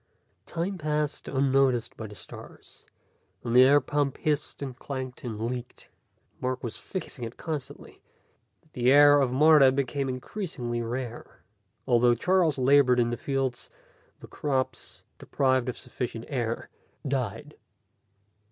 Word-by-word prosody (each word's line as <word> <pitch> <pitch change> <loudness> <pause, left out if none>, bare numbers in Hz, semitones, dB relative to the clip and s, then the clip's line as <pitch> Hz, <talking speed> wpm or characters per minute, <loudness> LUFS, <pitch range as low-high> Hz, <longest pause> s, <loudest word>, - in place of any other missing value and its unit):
Time 180 +3 -3
passed 150 -1 -2
unnoticed 135 -3 +1
by 110 - -7
the 105 - -12
stars, - - -13 0.6
and 120 0 -2
the 125 - +9
air 140 +3 +7
pump 145 0 -1
hissed 150 -1 -2
and 130 -3 -6
clanked 130 -2 -6
and 115 -4 -5
leaked. 120 +2 -5 0.5
Mark 130 +1 -3
was 120 -2 -4
fixing 165 -9 -7
it 115 +1 -7
constantly, 145 -4 -7 0.6
but 155 - -32
the 125 +1 +2
air 145 0 +7
of 130 -2 +1
Martha 145 0 +6
became 135 0 -1
increasingly 130 - -4
rare. 120 0 -6 0.4
Although 120 -1 +4
Charles 175 +3 +2
labored 130 -1 +4
in 120 0 +2
the - - -1
fields, 135 -1 -3 0.5
the - - -10
crops, 135 -3 -3 0.2
deprived 130 -2 +1
of 125 - -5
sufficient 120 -3 -6
air, 120 -4 -3 0.4
died. 135 +2 -3
130 Hz, 135 wpm, -27 LUFS, 120-145 Hz, 0.6 s, the